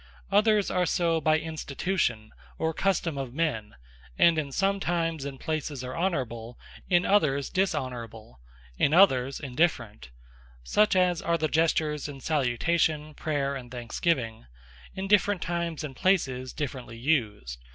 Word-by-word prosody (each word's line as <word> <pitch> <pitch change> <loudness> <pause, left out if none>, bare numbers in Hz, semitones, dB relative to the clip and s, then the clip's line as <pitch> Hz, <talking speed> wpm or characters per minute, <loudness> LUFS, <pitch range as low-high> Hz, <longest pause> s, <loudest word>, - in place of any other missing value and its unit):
Others 210 0 +3
are 180 -1 +1
so 165 -2 +1
by 155 +1 +3
Institution, 155 - -2 0.3
or 160 0 -1
Custome 170 -5 0
of 130 -1 -7
men; 120 -11 -2 0.4
and 170 -2 +5
in 140 -2 -4
some 195 +6 +1
times 165 -5 -1
and 135 -2 -6
places 150 -4 -3
are 125 - -5
Honourable; 125 -10 -2 0.3
in 175 -1 +3
others 140 -9 +2
Dishonourable; 125 - -3 0.4
in 145 - +3
others 135 -8 +4
Indifferent: 125 - -1 0.5
such 210 - +3
as 180 -2 +2
are 170 0 +1
the 155 -1 0
Gestures 155 -2 +1
in 140 -1 -8
Salutation, 150 +3 0
Prayer, 145 -3 -2
and 125 -3 -8
Thanksgiving, 120 - -2 0.5
in 190 +1 -4
different 205 -2 +3
times 170 -2 -3
and 140 -3 -6
places, 130 -10 +1
differently 130 -5 -5
used. 110 - -1
150 Hz, 135 wpm, -27 LUFS, 125-170 Hz, 0.5 s, and